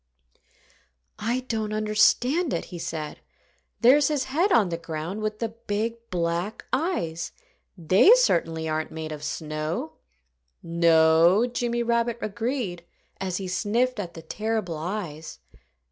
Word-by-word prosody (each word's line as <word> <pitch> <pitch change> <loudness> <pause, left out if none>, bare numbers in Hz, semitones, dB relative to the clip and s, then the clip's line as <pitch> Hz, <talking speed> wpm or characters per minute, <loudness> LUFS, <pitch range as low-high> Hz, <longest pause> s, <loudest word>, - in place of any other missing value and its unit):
"I 240 +4 -1
don't 220 -4 -3
understand 240 +9 +2
it," - - -3
he 175 - -5
said. 155 -2 -5 0.6
"There's 270 +4 +6
his 295 -4 0
head 320 +10 +1
on 210 - +4
the 170 - -2
ground, 165 +4 -5
with 215 0 -2
the 230 0 -2
big, 225 0 -3
black 175 +3 -2
eyes. 255 - -1 0.4
They 185 - +6
certainly 165 - +1
aren't 155 0 -2
made 160 0 -6
of 150 -1 -7
snow." 155 +1 -4 0.7
"No!" 165 +4 +4
Jimmy 240 -1 -1
Rabbit 235 0 +1
agreed, 215 -4 -3 0.4
as 185 -2 -2
he 195 - -4
sniffed 225 +6 0
at 175 -4 -5
the 165 - -9
terrible 215 -1 -2
eyes. 160 -2 -5
205 Hz, 130 wpm, -25 LUFS, 165-235 Hz, 0.7 s, There's